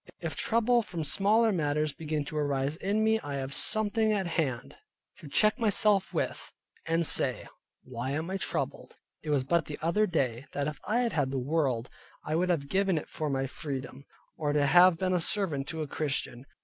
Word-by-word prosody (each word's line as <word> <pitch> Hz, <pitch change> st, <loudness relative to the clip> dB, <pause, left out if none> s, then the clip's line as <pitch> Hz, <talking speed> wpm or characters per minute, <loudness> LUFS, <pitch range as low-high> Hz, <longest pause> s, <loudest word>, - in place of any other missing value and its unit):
If -, -, -4 dB
trouble 235 Hz, +1 st, +2 dB
from 175 Hz, -7 st, -5 dB
smaller 210 Hz, +9 st, +3 dB
matters 150 Hz, -4 st, 0 dB
begin 155 Hz, -2 st, -3 dB
to 155 Hz, -, -8 dB
arise 145 Hz, -1 st, 0 dB
in 200 Hz, +5 st, 0 dB
me, 220 Hz, 0 st, +3 dB
I 145 Hz, -8 st, -5 dB
have 135 Hz, 0 st, -4 dB
something 215 Hz, +4 st, +1 dB
at 200 Hz, -3 st, 0 dB
hand 150 Hz, -8 st, -2 dB, 0.4 s
to 155 Hz, -, -11 dB
check 215 Hz, -, +2 dB
myself 210 Hz, -3 st, +2 dB
with, -, -, -3 dB, 0.4 s
and 165 Hz, +1 st, +2 dB
say, -, -, +3 dB, 0.4 s
why 125 Hz, 0 st, -5 dB
am 160 Hz, +5 st, -3 dB
I 195 Hz, -, -1 dB
troubled? -, -, -4 dB, 0.3 s
It 155 Hz, -, -7 dB
was 145 Hz, -3 st, +2 dB
but 165 Hz, +4 st, +1 dB
the 150 Hz, -, -5 dB
other 205 Hz, +7 st, +1 dB
day 135 Hz, -, -1 dB
that 145 Hz, -, -1 dB
if 150 Hz, -2 st, -4 dB
I 230 Hz, +5 st, +2 dB
had 235 Hz, -4 st, -1 dB
had 145 Hz, -4 st, +1 dB
the 135 Hz, -, -3 dB
world, 130 Hz, -3 st, 0 dB, 0.4 s
I 155 Hz, -, -2 dB
would 180 Hz, +3 st, +1 dB
have 155 Hz, -6 st, 0 dB
given 190 Hz, +1 st, +1 dB
it 150 Hz, -, -5 dB
for 155 Hz, -1 st, -3 dB
my 135 Hz, -1 st, 0 dB
freedom, 135 Hz, 0 st, -6 dB, 0.3 s
or 145 Hz, -2 st, -1 dB
to 145 Hz, -1 st, +3 dB
have 175 Hz, +4 st, +6 dB
been 185 Hz, +1 st, 0 dB
a 180 Hz, -, +1 dB
servant 160 Hz, -8 st, 0 dB
to 160 Hz, -1 st, -3 dB
a -, -, -6 dB
Christian. 135 Hz, -3 st, -3 dB
155 Hz, 200 wpm, -29 LUFS, 140-195 Hz, 0.4 s, have